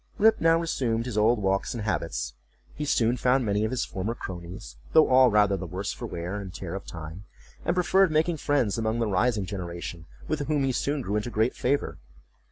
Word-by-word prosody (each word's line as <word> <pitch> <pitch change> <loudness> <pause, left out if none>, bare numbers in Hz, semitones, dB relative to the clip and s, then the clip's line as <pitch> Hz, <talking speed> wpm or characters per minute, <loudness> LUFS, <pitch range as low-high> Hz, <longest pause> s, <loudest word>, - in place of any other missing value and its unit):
Rip 220 +2 +4
now 165 0 +5
resumed 120 -8 -1
his 125 -4 -4
old 110 +3 +4
walks 95 +2 0
and 115 - -4
habits; 85 -6 -2 0.4
he 150 - -4
soon 120 -3 +2
found 125 +1 +2
many 105 0 +1
of - - -1
his 125 0 -1
former 100 +5 -3
cronies, 85 - -8 0.2
though 160 - +7
all 130 0 +6
rather 105 -2 +4
the 95 -1 -5
worse 95 +4 -4
for - - -6
the - - -11
wear 85 +4 -4
and 95 -2 -7
tear 90 -1 -6
of 95 - -6
time; 85 +4 -8 0.4
and 170 - 0
preferred 185 +1 +4
making 160 +2 +1
friends 130 -8 +1
among 110 0 0
the 115 - +1
rising 105 +1 +1
generation, 85 -3 -6 0.2
with 150 -3 -2
whom 150 -2 +1
he 135 - +1
soon 140 +3 -1
grew 105 0 -1
into 105 +3 -2
great 110 +1 +1
favor. 140 +3 -1
110 Hz, 210 wpm, -27 LUFS, 95-135 Hz, 0.4 s, though